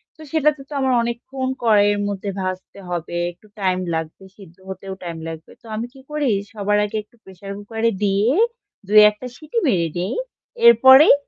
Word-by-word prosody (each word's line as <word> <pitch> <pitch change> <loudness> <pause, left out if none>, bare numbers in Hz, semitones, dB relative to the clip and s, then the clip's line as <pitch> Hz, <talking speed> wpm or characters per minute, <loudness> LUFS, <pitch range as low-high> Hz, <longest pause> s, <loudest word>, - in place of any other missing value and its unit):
তো 315 - -16
সেটাতে 300 -2 +2
তো - - -8
আমার 265 -1 +1
অনেকক্ষণ 260 +3 -4 0.2
কড়াইয়ের 205 -2 +4
মধ্যে 200 0 -4
ভাজতে 185 +1 -5
হবে। 175 -1 -4 0.2
একটু 195 +5 -22
টাইম 185 -1 +1 0.2
লাগবে 160 +4 -5
সিদ্ধ 180 -4 -15
হতেও 190 +1 -7
টাইম 170 -1 -5
লাগবে। 160 0 -8
তো - - -22
আমি 225 +2 -3
কি 270 - -15
করি? 300 -3 0 0.2
সবার 210 0 0
আগে 210 - -4
একটু 210 - -30
প্রেশার 190 +1 -10
কুকারে 225 +2 -1
দিয়ে 205 +4 +2 0.6
২-১ 210 0 +7
টা 255 - -5
সিটি 310 +8 -7
মেরে 170 -6 +1
দেই। 185 +5 -2 0.5
এরপরেই 275 - +8
205 Hz, 170 wpm, -21 LUFS, 185-255 Hz, 0.6 s, এরপরেই